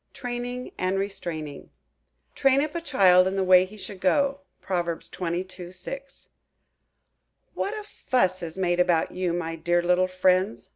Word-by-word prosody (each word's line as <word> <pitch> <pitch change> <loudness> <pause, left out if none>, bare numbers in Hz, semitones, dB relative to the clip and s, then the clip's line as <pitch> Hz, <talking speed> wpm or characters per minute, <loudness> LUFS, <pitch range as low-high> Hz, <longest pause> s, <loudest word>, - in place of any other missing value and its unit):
TRAINING 245 0 -5
AND 185 +1 0
RESTRAINING 165 -7 -5 0.6
"Train 270 0 +3
up 300 -1 -4
a 340 - -3
child 185 - +5
in 190 - -1
the 195 - +1
way 185 0 +6
he 210 +3 -13
should 200 -2 -8
go."–PROV. 190 - -1
xxii. 180 0 -5
6. 275 +9 -7 1.2
"WHAT 415 - -2
a 425 - -6
fuss 190 - 0
is 170 0 -6
made 175 -2 +1
about 175 -2 +2
you, 180 -1 -1
my 165 -1 -3
dear 175 +2 +1
little 180 +1 +3
friends!" 185 +2 +1
185 Hz, 145 wpm, -26 LUFS, 175-245 Hz, 1.2 s, way